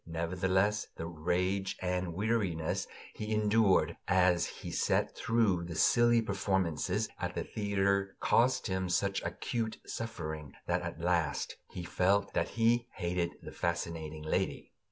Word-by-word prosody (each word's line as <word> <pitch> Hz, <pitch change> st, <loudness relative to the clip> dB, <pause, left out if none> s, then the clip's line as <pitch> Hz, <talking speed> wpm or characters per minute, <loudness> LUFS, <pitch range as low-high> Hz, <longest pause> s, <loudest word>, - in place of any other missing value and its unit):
Nevertheless, 95 Hz, +5 st, +1 dB
the 80 Hz, -, -4 dB
rage 90 Hz, +4 st, -1 dB
and 90 Hz, -2 st, -2 dB
weariness 95 Hz, -6 st, 0 dB, 0.3 s
he 105 Hz, 0 st, -5 dB
endured 105 Hz, -2 st, +3 dB
as 90 Hz, -1 st, +4 dB
he -, -, -8 dB
sat -, -, +1 dB
through 105 Hz, -7 st, +2 dB
the 85 Hz, -1 st, -6 dB
silly 120 Hz, +6 st, +4 dB
performances 95 Hz, -6 st, 0 dB
at -, -, -3 dB
the -, -, -1 dB
theater 100 Hz, -2 st, 0 dB
caused 130 Hz, +2 st, +3 dB
him 95 Hz, -3 st, -1 dB
such 100 Hz, +2 st, +1 dB
acute 115 Hz, -2 st, -3 dB
suffering 80 Hz, -10 st, -5 dB
that 90 Hz, +1 st, +1 dB
at 85 Hz, -1 st, -5 dB
last 85 Hz, -4 st, 0 dB
he 90 Hz, -, -6 dB
felt 100 Hz, +3 st, +1 dB
that -, -, 0 dB
he 115 Hz, +1 st, +3 dB
hated 85 Hz, -2 st, -1 dB
the -, -, -7 dB
fascinating 80 Hz, -2 st, -3 dB
lady. 80 Hz, -, -1 dB
95 Hz, 135 wpm, -32 LUFS, 85-105 Hz, 0.3 s, as